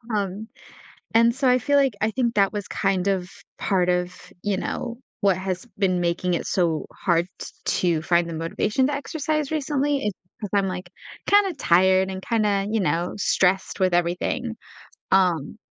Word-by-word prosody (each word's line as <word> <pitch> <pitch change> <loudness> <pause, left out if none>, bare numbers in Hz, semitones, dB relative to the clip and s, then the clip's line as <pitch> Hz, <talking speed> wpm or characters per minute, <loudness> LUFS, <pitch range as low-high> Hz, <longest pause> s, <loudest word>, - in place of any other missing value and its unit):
um, 200 +1 -3 0.7
and 230 +1 +5
so, 265 0 +1
I 250 0 +5
feel 285 +4 +1
like 270 -5 +2
I 215 - +2
think 235 -1 0
that 200 0 +3
was 205 -2 -5
kind 195 -1 0
of 185 -2 0 0.3
part 180 -2 +1
of, 180 0 0 0.3
you 205 -1 0
know, 235 +4 -4 0.2
what 195 -3 +3
has 185 +2 -4
been 185 -3 +2
making 175 +1 0
it - - -2
so 165 -4 0
hard 170 -2 +1
t - - -5 0.5
to 155 - -2
find 170 0 +2
the 165 - -5
motivation 210 +10 0
to 290 - -1
exercise 305 0 -2
recently 290 -2 0
is 210 - 0 0.3
because 205 -3 -5
I'm, 195 - +1
like, 180 -1 -6 0.4
kinda 405 -3 +4
tired 190 -3 +3
and 190 - -5
kinda, 205 -4 +1
you 220 -1 +1
know, 170 +1 0
stressed 190 -1 +1
with 185 -2 +3
everything, 180 +7 -1 0.6
um, 180 -3 +2
195 Hz, 170 wpm, -24 LUFS, 180-235 Hz, 0.7 s, and